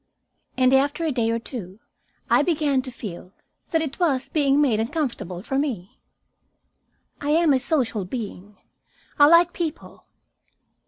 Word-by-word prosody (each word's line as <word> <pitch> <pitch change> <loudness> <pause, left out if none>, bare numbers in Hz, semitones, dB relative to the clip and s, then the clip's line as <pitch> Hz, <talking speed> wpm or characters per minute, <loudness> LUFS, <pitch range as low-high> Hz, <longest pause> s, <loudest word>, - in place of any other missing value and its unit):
And, 255 0 +4
after 285 +5 +2
a 315 - 0
day 235 -4 0
or 230 - +1
two, 220 -5 -7 0.5
I - - +4
began 295 -5 +1
to 255 - -7
feel 190 -5 -9 0.4
that 325 -1 +1
it 285 0 -6
was 275 -7 +1
being 285 -2 +2
made 255 -8 +2
uncomfortable 225 - -3
for 270 +3 -1
me. 230 -11 -4 1.2
I 290 - -3
am 320 -1 +4
a 265 - +3
social 250 - -1
being; 205 -2 -7 0.6
I 290 - +8
like 335 +2 +5
people. 330 -3 -6
270 Hz, 145 wpm, -23 LUFS, 225-300 Hz, 1.2 s, I